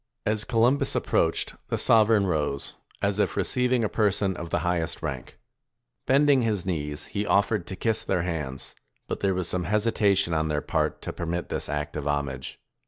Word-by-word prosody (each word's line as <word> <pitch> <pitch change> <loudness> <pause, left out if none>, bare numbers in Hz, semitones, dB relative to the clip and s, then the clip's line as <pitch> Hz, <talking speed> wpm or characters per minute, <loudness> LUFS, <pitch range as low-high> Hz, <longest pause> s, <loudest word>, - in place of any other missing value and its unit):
As 110 0 0
Columbus 125 +5 +2
approached, - - +1
the - - -1
sover 110 -1 +5
eign 100 - +1
rose, 75 -6 -1 0.3
as 100 +1 +1
if - - +1
receiving 125 -1 +1
a - - +2
person 100 -3 +1
of 85 -1 -6
the 85 - 0
highest 85 -2 -1
rank. - - -5 0.7
Bending 140 0 +5
his 105 -6 -1
knees, 75 -4 -3
he 105 - 0
offered 100 +1 +1
to 95 - -5
kiss 110 +3 0
their 90 -3 0
hands; 75 -7 -4 0.3
but - - -3
there 95 -2 +1
was 90 -2 -1
some 90 -1 -1
hesitation 105 -4 +2
on 80 0 +1
their 75 -1 0
part - - -1
to - - -4
permit 85 0 -3
this - - -1
act 75 +2 -3
of 75 -1 -3
homage. 70 -3 -3
95 Hz, 180 wpm, -26 LUFS, 80-110 Hz, 0.7 s, sover